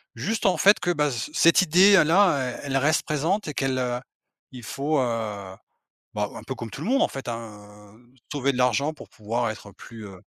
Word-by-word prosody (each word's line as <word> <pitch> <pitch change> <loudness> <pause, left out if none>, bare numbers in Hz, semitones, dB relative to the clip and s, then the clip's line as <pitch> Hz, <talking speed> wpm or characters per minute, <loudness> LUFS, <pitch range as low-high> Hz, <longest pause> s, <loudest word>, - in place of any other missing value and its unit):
juste 220 +1 -3
en 190 - +4
fait 205 +2 +5
que, 175 - 0
bah, 150 -3 +1
ce 120 +3 -4
cette 170 +2 +5
idée-là 180 -5 +4
elle 140 - -5
elle 135 - +1
reste 150 +3 +1
présente 160 +8 -1
et - - -5
qu'elle, 135 -1 -1
heu 125 -1 -2 0.5
il 125 -2 -10
faut, 145 +5 -1
heu, 105 -5 -4 0.6
bah, 105 -1 -1
un - - -8
peu 130 - -5
comme 115 -3 -8
tout 140 - -8
le - - -5
monde 270 +4 +2
en - - +2
fait, 135 -2 -8
hein, 105 -3 -9
heu, 120 +2 -25
trouver 140 -1 -1
de 125 - -5
l'argent 135 +5 +1
pour 155 - -13
pouvoir 115 +2 -3
être 105 -1 -10
plus, 110 +3 -12
heu 95 -2 -12
130 Hz, 215 wpm, -24 LUFS, 115-155 Hz, 0.6 s, fait